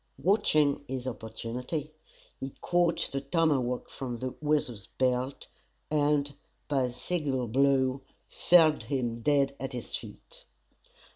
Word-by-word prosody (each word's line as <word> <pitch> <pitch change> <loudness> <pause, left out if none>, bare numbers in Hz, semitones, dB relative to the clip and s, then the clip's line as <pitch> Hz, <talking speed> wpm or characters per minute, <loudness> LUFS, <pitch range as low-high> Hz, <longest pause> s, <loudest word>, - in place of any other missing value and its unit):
Watching 155 -8 +3
his 130 -1 -4
opportunity, 125 +6 -5 0.5
he 135 0 -6
caught 175 -1 +2
the 135 - -2
tomahawk 140 -4 +1
from 125 -3 -5
the 130 +2 -4
Weasel's 145 -9 0
belt, 130 +1 -1 0.5
and 145 -1 +2 0.3
by 135 -3 +2
a 125 - -3
single 135 -2 -2
blow, 135 +2 +2 0.3
felled 160 -4 +5
him 120 -4 -2
dead 140 +1 +2
at 135 0 -4
his 120 -3 -4
feet. - - -10
135 Hz, 120 wpm, -29 LUFS, 125-150 Hz, 0.5 s, felled